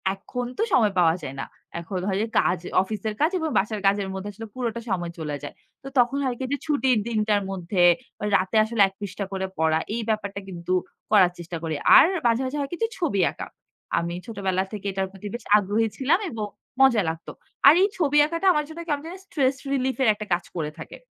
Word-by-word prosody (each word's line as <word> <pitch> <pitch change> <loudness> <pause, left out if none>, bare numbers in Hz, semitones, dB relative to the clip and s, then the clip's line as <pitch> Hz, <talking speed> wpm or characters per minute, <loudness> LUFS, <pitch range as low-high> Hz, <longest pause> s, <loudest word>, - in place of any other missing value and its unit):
এখন 245 +5 -5
তো 445 - +1
সময় 215 -6 +4
পাওয়া 165 -1 +4
যায় 135 -2 -6
না। - - -3 0.3
এখন 180 +2 -4
হয় 195 -1 0
যে 225 - -1
কাজ 180 - +1 0.2
অফিসের 215 +2 -3
কাজ 320 +4 +3
এবং 320 -1 -1
বাসার 210 +1 0
কাজের 200 -1 +1
মধ্যে 190 +2 -5
আসলে 225 +2 -8
পুরোটা 235 -2 -3
সময় 175 -3 -2
চলে 150 -2 -3
যায়। - - -6 0.3
তো - - -8
তখন 245 +3 +3
হয় 250 -2 -1
কি 260 - -2
যে 285 - +1
ছুটির 265 -5 +2
দিনটার 215 -2 +1
মধ্যে 180 0 -1 0.5
রাতে 185 +4 0
আসলে 220 -1 0
১ 195 - -11
পৃষ্ঠা 200 0 -4
করে 190 0 -2
পড়া 160 0 +3 0.2
এই 235 - -2
ব্যাপারটা 200 -2 -2
কিন্তু 175 0 -4 0.4
করার 185 -4 +6
চেষ্টা 170 0 -6
করি। 160 -2 -2 0.2
আর - - +9 0.2
মাঝে, 230 +2 +2
মাঝে 275 +3 -3
হয় 280 - -2
কিছু 455 +6 0
ছবি 280 - 0
আঁকা। - - -7 0.5
আমি 170 +1 -3
ছোটবেলা 190 -4 -1
থেকে 205 -1 -6
এটার 190 0 -2
প্রতি 195 +1 -9
বেশ 240 - -6
আগ্রহী 210 +3 +1
ছিলাম 295 +8 +2
এবং 220 -3 -4 0.4
মজা 240 -6 +6
লাগতো। 160 0 -6 0.4
আর 280 - +10
এই 405 - +3
ছবি 295 -4 +2
আঁকাটা 335 +5 -1
আমার 300 -1 0
জন্য 325 +2 -9
কেমন 290 -2 -1
জানি 350 +3 -7
স্ট্রেস 270 -7 +1 0.2
রিলিফ 260 -1 0
এর - - +3
একটা 210 0 -7
কাজ 175 - 0
করে 150 -3 -2
থাকে। - - -9
210 Hz, 210 wpm, -24 LUFS, 190-260 Hz, 0.5 s, আর